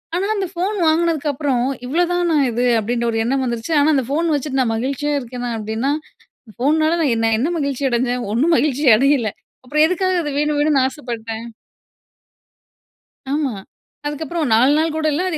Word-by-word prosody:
ஆனா, 370 - 0
அந்த 390 -2 -2
ஃபோன் 375 +5 -1
வாங்குனதுக்கப்பறம் 295 -6 +1 0.2
இவ்வளதானா 345 +3 +1 0.2
இது! 245 +2 0
அப்டின்ற 235 +2 -2
ஒரு 225 - -2
எண்ணம் 265 +3 0
வந்துருச்சு. 240 +6 -3
ஆனா, 285 - +3
அந்த 265 - +1
ஃபோன் 325 +4 0
வச்சுட்டு 280 -2 -1
நான் 225 -3 0
மகிழ்ச்சியா 275 +5 -2
இருக்கேனா? 245 -1 -6
அப்டின்னா 220 +6 -2 0.7
ஃபோனால 310 +5 +2
நான் 260 -6 +2 0.2
என்ன 280 +9 0
மகிழ்ச்சி 280 -1 -1
அடைஞ்சேன்? 245 0 0
ஒண்ணும் 295 +10 +2
மகிழ்ச்சி 285 +2 0
அடையல, 270 -3 +2 0.4
அப்புறம் 300 +4 +2
எதுக்காக 365 0 0
அது 295 - -3
வேணும் 300 0 0
வேணும்னு 290 -3 +3
ஆசைப்பட்டேன்? 230 -4 -6 1.9
ஆமா. 290 -2 0 0.6
அதுக்கப்புறம் 300 0 -3
4 250 +5 +5
நாள் 320 0 +1
கூட 315 0 -2
இல்ல 295 - 0
அது 320 - -2
285 Hz, 150 wpm, -19 LUFS, 245-315 Hz, 1.9 s, 4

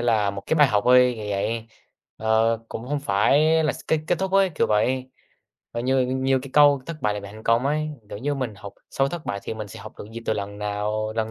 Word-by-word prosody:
là 110 -4 +2
một 100 0 -7
cái - - +1
bài 145 -3 +5
học 105 -3 +2
thôi, 125 0 +6
kiểu 105 -1 -6
vậy, 110 +3 -2 0.5
ờ, 110 +1 +2
cũng 120 +3 -7
không 145 0 -1
phải 145 +8 +3
là 155 - +2
s - - -10
kết 160 - +3
kết 170 - +1
thúc 190 0 -2
ấy, 195 -1 +4
kiểu - - +2
vậy. 130 +5 0 0.6
Và 120 - -3
như 130 +1 +2
như 130 +1 +1
cái 135 +1 -9
câu 145 -2 +5
"thất 165 -2 -5
bại 105 -1 +1
là 105 - -4
mẹ 100 0 -10
thành 110 +1 -11
công" 115 +4 +2
ấy, 155 +1 0 0.2
kiểu - - -7
như 145 +5 -1
mình 130 -6 -3
học 100 -1 -9 0.2
sau 135 0 +1
thất 170 0 -6
bại 100 0 -3
thì - - -5
mình 110 -1 -6
sẽ - - -10
học - - -10
được - - -8
gì 115 - -6
từ - - +2
lần 100 -1 -5
nào 105 +1 -2
lần 110 0 -1
115 Hz, 260 wpm, -24 LUFS, 105-140 Hz, 0.6 s, thôi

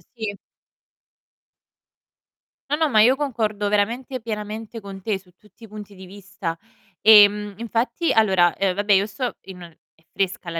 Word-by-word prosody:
Sì. 215 -3 -5 2.3
No, 295 - 0
no, 315 -2 +1
ma 215 -3 +4
io 250 +4 +5
concordo 220 -7 -2
veramente, 235 +5 -1
pienamente 220 +1 -6
con 195 -1 -10
te, 200 -1 -2
su 180 -1 -24
tutti 220 +2 -18
i - - -15
punti 210 -1 -11
di 190 0 -12
vista. 195 -3 -7 0.4
Ehm, 210 -1 +6
infatti 235 +8 -1
Allora, 190 -6 +3
uhm, 195 -2 +1
vabbè, 205 +1 +1
io 195 +1 +3
sto 235 +4 -5
in 190 -1 -11
un 170 -2 -13 0.2
è 160 - -31
fresca 190 -2 -3
la 165 0 -4
210 Hz, 160 wpm, -22 LUFS, 195-225 Hz, 2.3 s, Ehm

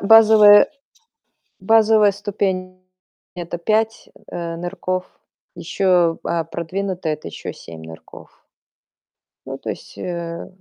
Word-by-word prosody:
базовая 215 -1 +7 0.9
базовая 215 +1 +4
ступень- 185 -2 -3 0.5
это 175 -1 -5
5, 220 +4 -1 0.2
э, 170 -1 -5
нырков, 180 +1 -4 0.5
ещё, 180 -4 +1
а, 170 -1 -1
продвинутая- 175 0 -4
это 150 - -9
ещё - - -7
7 80 -1 -12
нырков. 80 0 -14 1.1
Ну, - - -6
то - - -5
есть, - - -10
э 170 -1 -5
185 Hz, 100 wpm, -20 LUFS, 170-205 Hz, 1.1 s, базовая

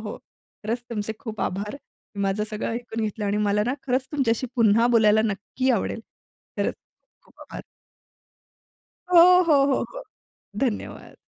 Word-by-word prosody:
हो. - - -8 0.5
खरंच 230 +3 -2
तुमचे 220 -1 -3
खूप 220 -3 -7
आभार. 200 +3 -3
तुम्ही 205 -7 -10
माझं 195 +2 0
सगळं 215 0 -3
ऐकून 235 -1 -5
घेतलं 210 0 -4
आणि 200 0 0
मला 210 0 +1
ना 250 - 0
खरंच 255 0 0
तुमच्याशी 255 -4 0
पुन्हा 230 0 +4
बोलायला 215 -1 +4
नक्की 225 +5 -2
आवडेल. 230 -1 -1 0.6
खरंच - - 0 0.5
खूप - - -24
आभार. - - -9 1.5
हो, 360 -1 +5 0.2
हो, 295 -5 +4
हो, - - +1
हो. - - -7 0.6
धन्यवाद. 245 -6 -3
225 Hz, 145 wpm, -24 LUFS, 210-255 Hz, 1.5 s, हो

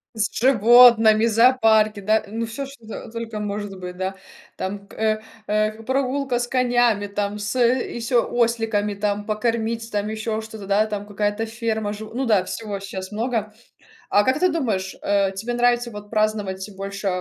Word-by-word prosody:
С 210 -2 0
животными 230 -2 +6
зоопарки, 225 -2 +4
да 215 +2 +1
ну, 225 +3 -3
всё, 230 +5 -5
что 230 -5 -10
только 230 -2 -5
может 205 -1 -4
быть, 180 0 -7
да, 190 +1 -3 0.4
там 200 +1 -5
к - - -17
э, 215 0 0 0.3
э, 215 +1 +1
прогулка 260 0 0
с 245 - -2
конями, 240 -5 +2
там, 205 +1 -3
с 205 +5 -3
ещё 240 0 +1
осликами, 225 -3 0
там, 205 0 -2
покормить, 225 +1 -2
там, 205 0 -1
ещё 220 0 -3
что-то, 220 -2 -9
да, 205 +2 +2
там 205 -1 -4
какая-то 205 +2 -1
ферма, 220 -2 -2
жив 215 +1 -8
ну 265 +3 -1
да, 210 -6 +3
всего 205 -2 -5
щас 190 -1 -7
много. 220 -1 -2 0.6
А 205 - +4
как 260 +5 +1
ты 365 +1 +3
думаешь, 210 - -2
э, 200 -1 +1
тебе 220 +5 -4
нравится 240 0 +2
вот 205 -1 -9
праздновать 215 -3 -1
больше 195 +1 -5
220 Hz, 165 wpm, -22 LUFS, 205-235 Hz, 0.6 s, животными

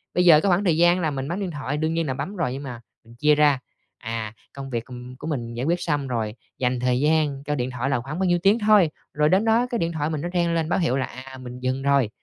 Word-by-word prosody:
bây 180 - +3
giờ 155 -3 +8
cái 200 - +1
khoảng 180 +2 +3
thời 165 -4 +3
gian 175 +2 +4
là 155 -2 0
mình 135 -1 -4
bấm 175 +5 -3
điện 190 -3 -3
thoại 145 -1 -3
đương 160 +1 0
nhiên 165 -1 -1
là 130 - -1
bấm 190 +10 -5
rồi, 165 -9 -1
nhưng 135 +2 -6
mà 120 -4 -7 0.2
mình 115 +1 -16
chia 150 +5 +3
ra, 145 -3 +4 0.4
à, 110 -1 -5 0.2
công 135 -1 -7
việc 120 -2 -3
của 125 - -11 0.3
của - - -6
mình 120 -7 -3
giải 120 +3 -2
quyết 175 +3 0
xong 145 -4 -1
rồi, 115 -4 -2 0.2
dành 125 -1 0
thời 125 0 +1
gian 150 -2 +1
cho 150 0 -2
điện 125 -1 -2
thoại 125 +2 -2
là 140 - +1
khoảng 145 +7 -6
bao 190 - +1
nhiêu 175 0 +2
tiếng 205 +4 +4
thôi, 210 -6 +5 0.2
rồi 150 0 +2
đến 190 +5 +3
đó 230 +2 +3
cái 240 -2 -1
điện 170 -2 0
thoại 155 -2 -2
mình 155 -2 -3
nó 175 - -3
reng 170 -1 +1
lên 165 -1 0
báo - - +1
hiệu 160 -7 +1
là, 130 - 0
à, 130 +1 -10
mình 125 -1 -9
dừng 130 +1 -2
rồi. 140 -5 +3
145 Hz, 295 wpm, -24 LUFS, 130-170 Hz, 0.4 s, giờ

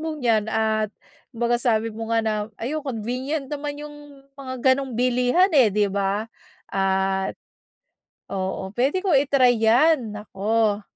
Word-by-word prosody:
mong 315 -1 -4
'yan 220 -3 +2
at 220 -1 0 0.4
kumbaga 240 +1 +1
sabi 225 -2 +1
mo 225 +1 -6
nga 230 - +3
na, 220 - +1 0.3
ayun, 295 +6 -3
convenient 260 +4 -3
naman 290 0 -4
'yong 295 0 -9 0.4
mga 260 -1 -6 0.2
gano'ng 270 -2 -5
bilihan, 250 +9 +3
eh, 245 -7 +6
'di 210 0 +2
ba. 200 +2 -1 0.4
At 190 0 0 1.0
oo 190 0 -3
puwede 270 +9 +1
ko 380 -4 +1
i-try 270 -3 +4
'yan, 235 0 +3
naku. 210 +1 0
235 Hz, 135 wpm, -23 LUFS, 210-275 Hz, 1.0 s, eh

